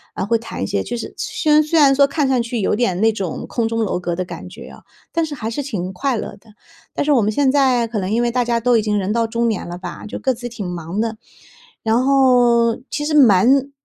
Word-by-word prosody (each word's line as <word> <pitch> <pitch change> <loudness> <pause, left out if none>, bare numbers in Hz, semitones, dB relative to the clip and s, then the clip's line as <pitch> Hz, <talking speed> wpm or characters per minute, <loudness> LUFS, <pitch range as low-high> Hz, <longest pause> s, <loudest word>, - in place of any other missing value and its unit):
呃， - - -2
会 230 +3 +2
谈 225 - -6
一 - - -2
些， 100 - -1
就 240 - -5
是 230 - -7
虽 310 - -1
然 300 +1 +6
虽 310 +2 0
然 280 -3 +6
说 280 +1 +4
看 290 +1 -1
上 255 -2 +2
去 235 -1 -3
有 - - +1
点 205 -5 0
那 225 0 +4
种 195 -6 -5
空 235 -2 -1
中 230 0 -2
楼 195 - -1
阁 175 -1 -3
的 185 - -2
感 180 - -9
觉 - - -11
啊， - - -14 0.3
但 330 -1 0
是 305 -2 -6
还 225 -4 -4
是 260 - -3
挺 200 -10 -4
快 260 +8 -1
乐 205 - -6
的。 215 +1 -21 0.4
但 - - -1
是 300 - +1
我 265 -5 +4
们 210 - +1
现 270 +3 +2
在 260 -4 +3
可 225 -2 -3
能 185 -1 -3
因 230 +2 +1
为 240 0 0
大 245 0 0
家 235 -1 0
都 245 0 +3
已 220 - +2
经 210 -1 -1
人 195 0 -1
到 230 0 +1
中 235 +1 0
年 215 -5 -3
了 175 0 -6
吧， 180 - -8
就 - - -6
各 260 - 0
自 240 0 -7
挺 230 -4 -7
忙 175 +2 -4
的， 225 -1 -3 0.7
然 225 +3 +2
后， 245 -4 +4
其 295 - -3
实 305 - -2
蛮 265 +2 +5
235 Hz, 290 characters per minute, -19 LUFS, 210-265 Hz, 0.7 s, 然